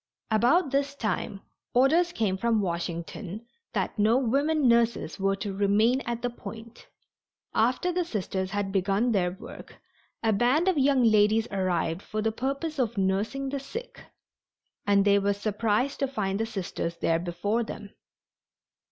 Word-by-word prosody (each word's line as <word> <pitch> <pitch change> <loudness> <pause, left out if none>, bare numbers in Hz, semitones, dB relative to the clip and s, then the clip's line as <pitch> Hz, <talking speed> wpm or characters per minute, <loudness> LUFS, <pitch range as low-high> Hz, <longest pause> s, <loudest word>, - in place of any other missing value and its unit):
About 260 +8 +3
this 280 0 0
time 215 -5 -3 0.3
orders 320 +8 +4
came 210 - 0
from 225 +3 +1
Washington 175 +3 -4 0.3
that - - -2
no 220 +4 +4
women 280 +3 +2
nurses 235 -2 +2
were 195 0 +1
to 200 0 -4
remain 210 +6 +3
at 235 0 -3
the 245 - +1
Point. 230 -1 -10 0.7
After 255 +10 +2
the 355 0 0
Sisters 190 - -3
had 200 0 -2
begun 195 +5 +1
their 185 -5 +2
work 180 - -11 0.5
a 220 -1 +3
band 250 - +2
of 375 - +3
young 275 -2 +3
ladies 215 0 +4
arrived 185 -3 -1
for 215 - -5
the 220 +1 +1
purpose 275 +6 -3
of 235 -3 0
nursing 205 +8 0
the 280 +1 -3
sick, 470 - -8 0.8
and 200 -1 +4
they 200 0 +5
were 200 0 +1
surprised 215 +5 -1
to 275 - +1
find 200 -7 -2
the 225 - -1
Sisters 180 -5 -4
there 165 0 +1
before 180 +6 -1
them. 205 -2 -8
220 Hz, 150 wpm, -27 LUFS, 195-260 Hz, 0.8 s, they